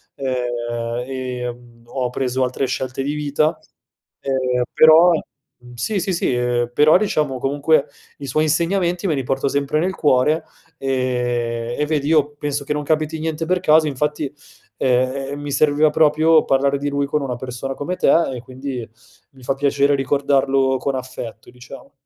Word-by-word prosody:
ehm, 120 -2 -3
e, 125 -2 -4
mhmm, 120 -1 -19
ho 125 0 -2
preso 130 +1 -1
altre 125 +2 -2
scelte 130 +1 -3
di 145 +2 -2
vita, 150 +2 0 0.6
ehm, 130 -2 0
però 160 +3 +7 0.5
mhmm, 125 0 -15
sì, 195 - -1
sì, 190 +1 -1
sì, 170 - 0
ehm, 120 -1 0
però, 150 +6 +6
diciamo, 155 -9 0
comunque 145 +2 +1 0.3
i 140 - -7
suoi 155 +4 +1
insegnamenti 175 +3 0
me 160 - +1
li 135 - -2
porto 135 +2 -1
sempre 140 +2 0
nel 185 +2 0
cuore, 150 +2 +2 0.3
ehm, 120 -3 -1
e 150 - +2
vedi 150 -2 -1
io 150 -2 +3
penso 145 -1 -3
che - - -5
non 150 0 -3
capiti 155 +1 -1
niente 160 0 -3
per 180 +2 +1
caso, 155 -2 +4
infatti, 150 0 -2 0.4
ehm, 130 +2 0
ehm, 145 0 -5
mi 145 0 -5
serviva 150 +2 +3
proprio 155 +1 +4
parlare 140 +1 +2
di 145 +1 -2
lui 140 0 0
con 150 +1 -1
una 130 -3 -3
persona 130 +2 -5
come 175 +7 -3
te, - - +3 0.2
e 120 - -7
quindi 130 -1 -6 0.4
mi 130 -2 -18
fa 135 - 0
piacere 140 0 +2
ricordarlo 135 -1 +1
con 135 +1 -2
affetto, 130 -3 -7
diciamo. 125 +3 -13
140 Hz, 170 wpm, -20 LUFS, 125-150 Hz, 0.6 s, però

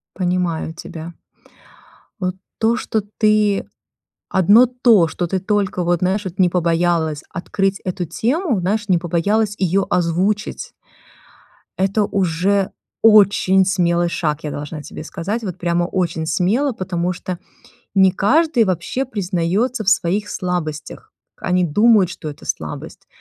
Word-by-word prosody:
Понимаю 180 -3 -1
тебя. 165 0 -8 1.1
Вот 185 -1 -2 0.2
то, 225 +1 +2
что 225 -3 -2 0.2
ты 210 -2 +2 0.6
одно 205 +6 +5
то, 235 -8 +4
что 175 - -3
ты 190 +3 -1
только, 195 -2 0
вот, 175 -1 +1
знаешь, 190 +3 0
вот, 185 -1 -7
не 185 -2 +5
побоялась 170 -3 0
открыть 195 +3 -2
эту 180 -1 -3
тему, 240 - -1
знаешь, 205 +4 -1
не 180 -3 +4
побоялась 200 +5 0
её 190 +1 +1
озвучить 180 +4 -1 1.1
это 195 +3 +2
уже 195 +1 0 0.3
очень 200 -3 +5
смелый 175 -2 +1
шаг, 155 -2 -2
я 150 - -4
должна 150 +1 -6
тебе - - -9
сказать, 210 +9 -4
вот 185 -5 -5
прямо 175 0 0
очень 170 -3 -2
смело, 210 - +1
потому 180 -2 -2
что 180 0 -6 0.6
не 190 -1 +5
каждый 260 - +2
вообще 185 +8 -2
признается 205 +2 -1
в 195 - +3
своих 205 0 +1
слабостях. 165 -5 -4 0.2
Они 180 0 0
думают, 205 +3 +4
что 155 -3 -7
это 145 - -12
слабость. - - -5
185 Hz, 130 wpm, -19 LUFS, 170-210 Hz, 1.1 s, одно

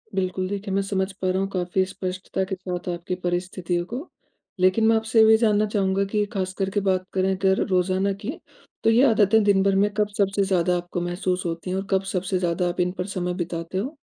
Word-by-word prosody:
बिल्कुल 185 0 -1
देखिए, 200 -1 -4
मैं 195 - +2
समझ 195 0 -1
पा 185 -1 -3
रहा 185 +1 +1
हूँ 195 - 0
काफ़ी 185 0 0
स्पष्टता 185 0 -4
के - - 0
साथ 180 -1 -6
आपकी 175 +1 -3
परिस्थितियों 175 0 -2
को। 255 - -6 0.5
लेकिन 185 +4 +3
मैं 225 - +5
आपसे 220 +1 +1
ये 220 - +8
भी 220 0 +7
जानना 215 -2 +3
चाहूँगा 195 -2 0
कि 210 -1 +1
ख़ास 185 -1 -2
करके 195 +1 0
बात 185 -1 +1
करें 190 0 +1
अगर 190 0 +2
रोज़ाना 190 +1 +1
की, 205 +6 -5 0.5
तो 225 - +4
ये 235 +4 +5
आदतें 215 0 +4
दिन 195 -1 +3
भर 195 -1 +2
में 205 +2 +3
कब 210 -1 +2
सबसे 200 0 +2
ज़्यादा 180 -2 +1
आपको 175 0 -4
महसूस 180 +1 -2
होती 170 +2 -4
हैं, 185 - -1
और 195 0 -4
कब 190 0 +2
सबसे 185 0 -1
ज़्यादा 175 0 0
आप 175 - -5
इन 180 0 +2
पर 180 - -2
समय 180 0 -1
बिताते 175 0 -4
हो? 265 +11 -3
190 Hz, 220 wpm, -24 LUFS, 180-200 Hz, 0.5 s, ये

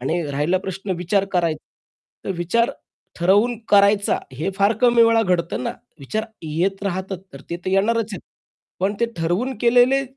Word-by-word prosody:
आणि 160 +7 -1
राहिला 150 +7 +1
प्रश्न 190 +1 -6
विचार 190 +3 +1
कराय 170 -3 +1 0.7
तर - - -3
विचार 230 +9 +1 0.5
ठरवून 205 +7 +3
करायचा 200 0 +4
हे 155 +9 -3
फार 200 +2 +3
कमी 240 -1 +6
वेळा 230 0 +4
घडतं 175 - -1
ना. - - -2 0.3
विचार 215 +11 -3 0.2
येत 175 +6 -1
राहतात 190 -1 -3
तर 140 - -10
ते 170 - -2
तर 185 - -1
येणारच 220 +3 +1
आहेत. 195 - -5 0.6
पण 195 +2 +1
ते 235 - +3
ठरवून 180 +11 -1
केलेले 245 +3 +4
195 Hz, 160 wpm, -21 LUFS, 175-225 Hz, 0.7 s, कमी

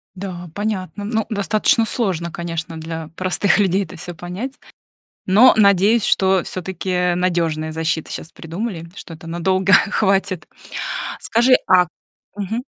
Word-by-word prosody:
Да, 180 -2 -7
понятно. 205 -2 -3
Ну, 220 0 -1
достаточно 215 +2 +2
сложно, 185 -8 -1
конечно, 165 -1 -5
для 160 0 -6
простых 185 +3 +2
людей 195 0 +2
это - - -12
всё 175 +2 -7
понять. 180 +10 -6 0.7
Но, 215 +7 +7
надеюсь, 200 +1 +4
что, 190 -1 +3
всё-таки, 180 -1 -2
надёжные 165 -3 0
защиты 160 0 -2
щас 165 - -7
придумали, 170 +1 -5
что 170 - -9
это 160 +1 -13
надолго 185 +3 +1
хватит. 195 -4 +2 0.7
Скажи, 240 +3 +3
а 180 -2 +5 0.5
Мгм. 220 +5 -3
185 Hz, 125 wpm, -20 LUFS, 170-205 Hz, 0.7 s, Но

